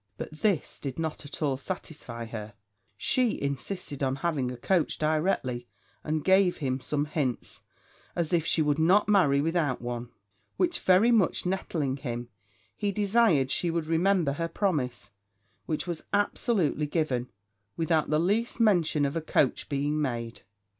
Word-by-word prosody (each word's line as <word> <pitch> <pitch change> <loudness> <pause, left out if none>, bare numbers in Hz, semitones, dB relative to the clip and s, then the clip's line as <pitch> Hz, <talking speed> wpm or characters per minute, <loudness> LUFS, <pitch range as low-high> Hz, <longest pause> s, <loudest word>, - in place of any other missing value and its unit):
But - - -6
this 170 +2 -1
did 135 -3 -5
not 160 -2 -3
at 145 - -6
all 140 -3 +1
satisfy 140 -7 -6
her; 110 -2 -7 0.4
she 245 - +1
insisted 140 +2 -4
on 135 -1 +1
having 145 -7 0
a 125 - -6
coach 175 +6 +1
directly, 155 -6 0 0.4
and 155 -1 -1
gave 190 -1 +4
him 130 -3 -2
some 145 +3 -1
hints, 145 -5 -3 0.5
as 170 0 -1
if 170 -2 +3
she 160 0 +2
would 150 0 +1
not 185 +6 +4
marry 175 -10 +4
without 160 -4 0
one; 120 0 -5 0.5
which 350 -1 +1
very 190 +6 +5
much 210 -7 +2
nettling 160 -7 -1
him, 120 -3 -5 0.5
he 205 -1 -1
desired 200 - +3
she 175 - +1
would 165 -1 -1
remember 165 -1 +2
her 165 +3 -2
promise, 145 - -2 0.6
which 155 0 -1
was 170 -3 -4
absolutely 205 - +1
given, 140 -6 -1 0.5
without 160 -1 +1
the 150 - +3
least 210 +8 0
mention 175 -9 +3
of 140 - -2
a 165 - 0
coach 145 -3 +1
being 145 +1 0
made. 120 -4 -3
155 Hz, 155 wpm, -28 LUFS, 135-180 Hz, 0.6 s, very